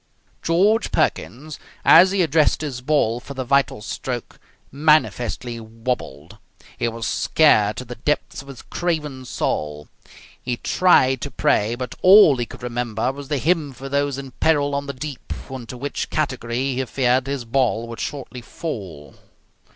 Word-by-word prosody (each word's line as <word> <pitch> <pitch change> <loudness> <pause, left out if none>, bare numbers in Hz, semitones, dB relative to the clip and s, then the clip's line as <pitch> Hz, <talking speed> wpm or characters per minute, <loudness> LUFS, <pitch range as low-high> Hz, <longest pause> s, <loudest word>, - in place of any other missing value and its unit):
George 200 +7 +2
Perkins, 155 -1 -2 0.3
as 180 +3 +8
he 195 -1 +2
addressed 155 -1 +2
his 135 -5 -4
ball 125 -5 +1
for 140 +3 -10
the 130 - -3
vital 130 -4 +1
stroke, 125 +1 -5 0.3
manifestly 125 -5 +1
wabbled. 115 - -5 0.4
He - - -1
was 115 -1 -4
scared 110 -10 +3
to 125 - -5
the 120 - -7
depths 140 +5 -2
of 140 - -16
his 135 -3 -10
craven 150 -7 -3
soul. 75 -9 -3 0.5
He 125 -1 -3
tried 130 -8 +3
to 140 - -4
pray, 120 -5 +1
but 125 0 -5
all 185 -6 +8
he 120 -1 -2
could - - -12
remember 120 0 -2
was 140 0 -9
the 145 - -1
hymn 155 -1 0
for 135 +2 -8
those 140 -1 0
in 135 -1 -7
peril 145 +1 +1
on 140 0 -2
the 140 - -4
deep, 140 0 -8 0.2
into 125 -1 -7
which 145 +3 -4
category, 130 -3 -2
he 130 +1 -1
feared, 130 +1 +1
his 135 -3 -3
ball 115 -2 0
would 115 0 -8
shortly 130 -3 -6
fall. 95 - -7
130 Hz, 160 wpm, -22 LUFS, 120-150 Hz, 0.5 s, as